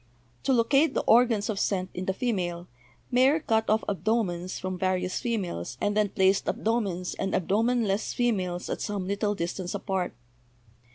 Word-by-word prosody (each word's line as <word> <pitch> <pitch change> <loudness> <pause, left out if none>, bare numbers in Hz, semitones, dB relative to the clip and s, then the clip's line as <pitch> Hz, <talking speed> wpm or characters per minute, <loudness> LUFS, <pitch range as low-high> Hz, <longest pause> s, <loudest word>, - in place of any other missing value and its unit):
To - - +2
locate 275 +6 +3
the - - +1
organs 230 -3 +4
of 210 -3 -2
scent 185 -3 -1
in 180 - -4
the 190 - 0
female, 180 -7 -2 0.4
Mayer 260 +5 +4
cut 220 -6 0
off 215 +1 +3
abdo 220 +3 +1
mens 175 0 -5
from 185 -1 -4
various 185 0 0
females 185 - -3
and 205 0 0
then 210 -1 +2
placed 190 0 +2
abdomens 200 -6 -1
and 195 - -1
abdomenless 215 +2 +1
females 185 -7 0
at - - -3
some 200 -4 -3
little 205 +1 0
distance 175 +1 -3
apart. 190 - -2
200 Hz, 160 wpm, -27 LUFS, 185-225 Hz, 0.4 s, organs